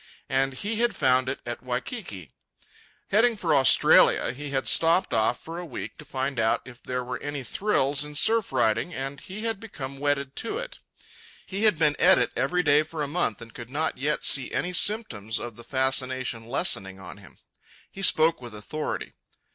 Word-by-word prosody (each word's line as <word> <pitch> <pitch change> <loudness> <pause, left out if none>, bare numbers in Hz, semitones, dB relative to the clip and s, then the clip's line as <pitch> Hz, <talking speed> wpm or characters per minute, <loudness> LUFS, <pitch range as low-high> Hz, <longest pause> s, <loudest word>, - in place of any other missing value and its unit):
And 135 0 +1
he 210 - -2
had 235 -3 +2
found 130 -3 +2
it 135 - -4
at 120 0 -5
Waikiki. 125 - -5 0.8
Heading 225 +2 +3
for 165 -5 0
Australia, 135 -3 +5
he 145 +3 -7
had 135 -1 -1
stopped 165 +3 +4
off 110 +2 +1
for 165 +2 -7
a - - -5
week 105 -6 -7
to 150 - -11
find 135 -1 -2
out 110 0 +1
if 125 -2 -13
there 125 0 -3
were 125 +1 -5
any 145 -2 -4
thrills 145 - 0
in 150 0 -9
surf 225 +7 +2
riding, 110 +10 +1
and 135 +1 -5
he 195 +3 -8
had 225 -3 -2
become 140 -11 -8
wedded 140 -1 -1
to 230 - -3
it. - - -7 0.7
He 200 +3 0
had 210 -6 +4
been 150 -2 +3
at 190 +1 +6
it - - +1
every 180 0 +1
day 150 -1 +5
for 155 0 -5
a - - -2
month 140 -8 -1
and 115 - -14
could 120 -1 -9
not 150 0 -2
yet 150 +3 -1
see 135 -3 +2
any 180 +1 -2
symptoms 120 - -1
of 120 -2 -6
the 120 - -12
fascination 130 -2 -1
lessening 100 - -1
on 90 -2 -10
him. - - -16 0.5
He 195 - -9
spoke 160 -5 +3
with 120 -3 -9
authority. 150 +9 -5
140 Hz, 190 wpm, -26 LUFS, 125-175 Hz, 0.8 s, at